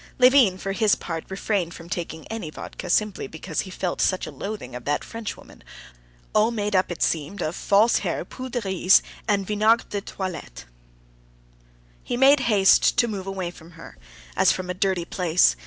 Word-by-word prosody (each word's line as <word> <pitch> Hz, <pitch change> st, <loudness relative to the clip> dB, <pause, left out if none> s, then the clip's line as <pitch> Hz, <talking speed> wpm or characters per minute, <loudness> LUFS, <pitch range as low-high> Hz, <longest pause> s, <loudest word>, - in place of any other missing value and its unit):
Levin 250 Hz, -7 st, +5 dB
for 195 Hz, +1 st, -4 dB
his 210 Hz, +1 st, +3 dB
part 165 Hz, -1 st, -5 dB
refrained 190 Hz, -3 st, -2 dB
from 165 Hz, -, -11 dB
taking 165 Hz, -3 st, -5 dB
any 225 Hz, -8 st, -5 dB
vodka 155 Hz, -, -8 dB
simply 210 Hz, -4 st, +1 dB
because 160 Hz, +2 st, -5 dB
he 190 Hz, -, -9 dB
felt 180 Hz, -1 st, -3 dB
such 185 Hz, -, +1 dB
a -, -, -7 dB
loathing 200 Hz, -, -6 dB
of 125 Hz, -, -7 dB
that 145 Hz, +3 st, -1 dB
Frenchwoman, 225 Hz, -2 st, -8 dB, 0.7 s
all 215 Hz, +1 st, +4 dB
made 210 Hz, -3 st, -2 dB
up, 185 Hz, -1 st, +2 dB
it 175 Hz, -, -2 dB
seemed, 160 Hz, +5 st, -1 dB
of 155 Hz, +3 st, -2 dB
false 210 Hz, +4 st, +3 dB
hair, -, -, -3 dB
poudre 255 Hz, -2 st, -5 dB
de -, -, -5 dB
riz, 190 Hz, 0 st, +4 dB, 0.2 s
and 200 Hz, -2 st, +1 dB
vinaigre 215 Hz, +3 st, +3 dB
de 205 Hz, -, -2 dB
toilette. 180 Hz, -, -7 dB, 1.4 s
He 240 Hz, -, -3 dB
made 270 Hz, +2 st, +6 dB
haste 195 Hz, -3 st, +5 dB
to 240 Hz, -, +4 dB
move 195 Hz, -4 st, -5 dB
away 190 Hz, -3 st, -3 dB
from 170 Hz, -1 st, -15 dB
her, 165 Hz, -, -12 dB, 0.4 s
as -, -, +4 dB
from 180 Hz, -1 st, -3 dB
a -, -, -2 dB
dirty 185 Hz, -2 st, 0 dB
place. 170 Hz, -, +2 dB
190 Hz, 180 wpm, -24 LUFS, 175-215 Hz, 1.4 s, made